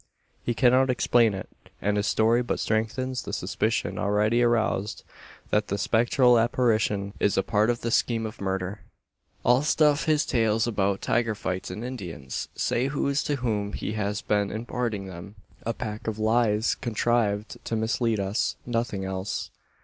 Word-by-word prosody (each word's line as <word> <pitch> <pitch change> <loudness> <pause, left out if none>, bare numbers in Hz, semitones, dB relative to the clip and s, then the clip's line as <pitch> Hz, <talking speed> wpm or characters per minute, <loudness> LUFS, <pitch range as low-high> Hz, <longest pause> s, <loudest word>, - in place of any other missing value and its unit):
He 120 - -1
cannot 130 +1 +4
explain 120 -3 +3
it; 95 - -6 0.3
and 105 +2 0
his 105 0 0
story 115 +2 +3
but 120 - -2
strengthens 125 +4 -1
the - - -7
suspicion - - -1
already 105 +3 +2
aroused 110 -3 +1 0.5
that 105 0 +2
the 100 - -1
spectral 120 +3 +4
apparition 110 -4 +1
is 100 - +2
a 95 - +3
part 105 +3 +2
of 120 -1 0
the 115 - -2
scheme 115 -1 +1
of 110 0 -7
murder! 95 +1 -2 0.7
"All 125 +2 +5
stuff 150 -1 +3
his 155 -2 +2
tales 115 -2 +2
about 100 -4 0
tiger 115 -2 +1
fights 95 -2 -3
and 105 +6 -5
Indians!" 90 - -5
say 125 +3 0
those 140 0 0
to 145 - -1
whom 105 -6 -2
he - - -3
has 105 0 -2
been 105 -1 +1
imparting 115 -2 -3
them. 95 +2 -9 0.3
"A 115 - +1
pack 105 +1 -6
of 110 -1 -2
lies, 110 0 +2
contrived 110 -2 -1
to 115 - -2
mislead 110 0 0
us 100 +2 0
nothing 115 -5 -2
else." 95 +1 -4
110 Hz, 160 wpm, -26 LUFS, 100-120 Hz, 0.7 s, All